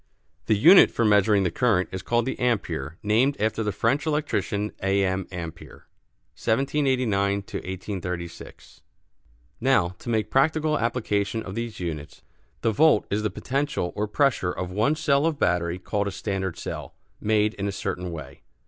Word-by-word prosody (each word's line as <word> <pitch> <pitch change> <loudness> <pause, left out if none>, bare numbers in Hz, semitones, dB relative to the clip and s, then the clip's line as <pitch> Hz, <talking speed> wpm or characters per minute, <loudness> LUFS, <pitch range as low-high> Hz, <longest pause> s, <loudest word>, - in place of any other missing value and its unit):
The 110 - +3
unit 170 - +8
for 115 - 0
measuring 105 -1 +4
the 90 - 0
current 105 -4 +2
is 95 - -4
called 120 +5 0
the 130 - -2
"ampère," 100 - -1
named 115 +7 +2
after 110 +1 0
the 105 -1 0
French 125 - 0
electrician, 145 -9 -1
A. 95 +1 +2
M. 95 0 -1
Ampère 85 -4 -9 0.6
(1789 125 -6 +1
1836). 90 -3 -6 0.8
Now, 130 -8 +3
to - - -8
make 110 -2 0
practical 155 +2 +2
application 110 -2 -1
of 95 - -7
these 115 0 -5
units. 80 -5 -6 0.4
The 115 - +2
volt 150 0 +4
is 105 +2 +1
the 105 - 0
potential 135 -9 -2
or 105 +1 -1
pressure 120 -6 +1
of 90 0 -5
one 110 +10 +2
cell 145 0 +2
of 160 -3 -1
battery 85 -3 +1
called 100 +2 -2
a - - -2
standard 95 -3 -3
cell, - - -6 0.2
made 105 0 +2
in 100 0 -3
a - - -1
certain 90 -2 -4
way. 80 -3 -9
105 Hz, 155 wpm, -25 LUFS, 95-125 Hz, 0.8 s, unit